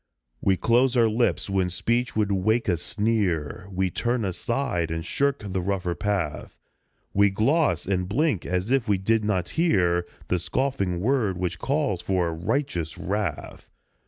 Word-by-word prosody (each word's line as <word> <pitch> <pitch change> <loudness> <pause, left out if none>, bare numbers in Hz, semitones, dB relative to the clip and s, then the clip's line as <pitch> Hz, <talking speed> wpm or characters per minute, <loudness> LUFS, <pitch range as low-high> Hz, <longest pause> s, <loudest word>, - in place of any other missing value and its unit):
We 95 -1 +2
close 125 +4 +3
our 115 -1 +5
lips 115 +2 +1
when 95 -2 +1
speech 120 +7 -1
would 105 -2 +1
wake 110 +5 +1
a 90 - +3
sneer; 95 -5 -1
We 95 -1 0
turn 120 +1 -1
aside 95 - -1
and 80 0 -3
shirk 140 -3 0
the 95 -2 -2
rougher 90 -2 -1
path; 95 -6 -2 0.6
We 100 0 +5
gloss 135 - +1
and 90 -1 -1
blink 135 - +1
as 90 +6 -2
if 135 -3 +2
we 100 -2 +3
did 110 +4 +1
not 95 -4 0
hear 90 - +2 0.2
The 90 - +1
scoffing 100 -4 -1
word 110 -5 +1
which 90 -2 -3
calls 135 - 0
for 90 -3 0
righteous 85 - -2
wrath. 95 -5 -4
100 Hz, 155 wpm, -25 LUFS, 90-120 Hz, 0.6 s, our